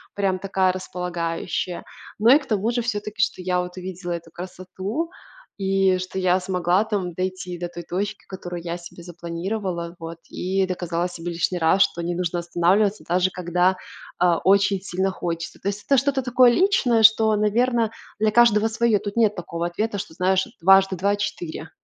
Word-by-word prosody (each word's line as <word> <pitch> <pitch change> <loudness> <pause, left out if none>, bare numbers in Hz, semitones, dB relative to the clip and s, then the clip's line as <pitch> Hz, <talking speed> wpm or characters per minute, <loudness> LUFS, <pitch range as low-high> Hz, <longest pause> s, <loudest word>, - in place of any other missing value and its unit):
прям, 195 -2 +1
такая, 190 -1 +1
располагающая. 180 -1 -3 0.4
Но, 230 +4 +7
и, - - +5
к 280 - -12
тому 215 0 0
же, 240 0 0
все-таки, 210 -2 -3
что 195 - 0
я, 180 0 0
вот, 180 +1 -7
увидела 180 -1 -6
эту 170 -1 -5
красоту, 185 - -5 0.5
и, 195 -1 +2
что, 185 +1 -4
я 185 0 +3
смогла, 180 +1 +1
там, 195 -5 -2
дойти 185 -1 -4
до 175 - -3
той 175 0 -8
точки, 200 +5 -4
которую 175 -2 -6
я 170 0 -3
себе 175 0 -12
запланировала, 175 +1 -4
вот, 165 0 -7
и 190 +1 -1
доказала 175 -1 -2
себе 175 0 -6
лишний 175 +2 -1
раз, 165 +4 +3
что 170 - -2
не 175 +1 -1
нужно 175 -1 -2
останавливаться, 185 +5 +1
даже 180 +2 +2
когда, 180 +1 +1 0.4
а, 175 -2 +4
очень 200 0 +3
сильно 190 0 -1
хочется. 170 -2 -4
То 200 - -2
есть, 205 +1 -5
это 275 - +4
что-то 270 +1 +1
такое 250 0 +5
личное, 260 - +3
что, 220 0 +6
наверное, 230 +2 +2 0.3
для 215 0 +3
каждого 225 -2 +5
свое. 225 -1 +2
Тут 205 +2 -6
нет 215 -2 +3
такого 170 -1 -4
ответа, 210 +4 -2
что, 185 - -7
знаешь, 185 +1 +1
дважды 195 +1 +5
два 200 +3 +1
четыре. 170 -5 -4
185 Hz, 175 wpm, -23 LUFS, 175-210 Hz, 0.5 s, Но